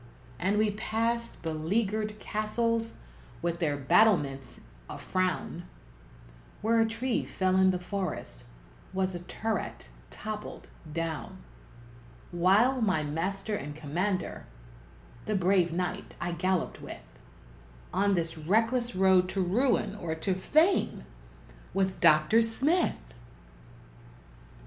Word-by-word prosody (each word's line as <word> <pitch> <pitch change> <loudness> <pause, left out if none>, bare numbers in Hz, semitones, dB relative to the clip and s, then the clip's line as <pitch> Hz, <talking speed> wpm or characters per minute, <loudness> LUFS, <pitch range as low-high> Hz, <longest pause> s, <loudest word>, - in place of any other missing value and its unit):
And 195 +4 +1
we 215 0 +3
passed 230 +2 -2
beleaguered 210 +7 -1
castles, 225 +2 -1 0.5
with 170 -1 -1
their 150 -4 0
battlements 140 - +2 0.3
a - - -6
frown; 185 0 -2 1.0
Where 230 +1 +3
a 225 - +3
tree 230 +3 -1
fell 185 -1 0
in 190 0 +5
the 185 - +1
forest 180 - -5 0.5
was 190 0 0
a 175 - -4
turret 200 - -4 0.2
toppled 215 0 -7 0.2
down; 160 -4 -4 0.9
While 200 +9 +3
my 185 -8 +2
master 190 +8 -2
and 145 -7 -4
commander 175 +6 -2 0.8
the 215 - -1
brave 185 -2 +3
knight 180 +1 -3
I 175 - -2
galloped 185 +1 -1
with - - -9 0.9
On 200 +2 +2
this 165 -2 -2
reckless 225 +8 +1
road 185 -1 +4
to 195 - -1
ruin 225 +4 +2
or 170 -6 -3
to 185 +4 -1
fame, 310 - +2 0.7
was 190 -1 +2
Dr. 155 +9 +5
Smith! 275 +10 +1
190 Hz, 110 wpm, -29 LUFS, 170-220 Hz, 1.0 s, in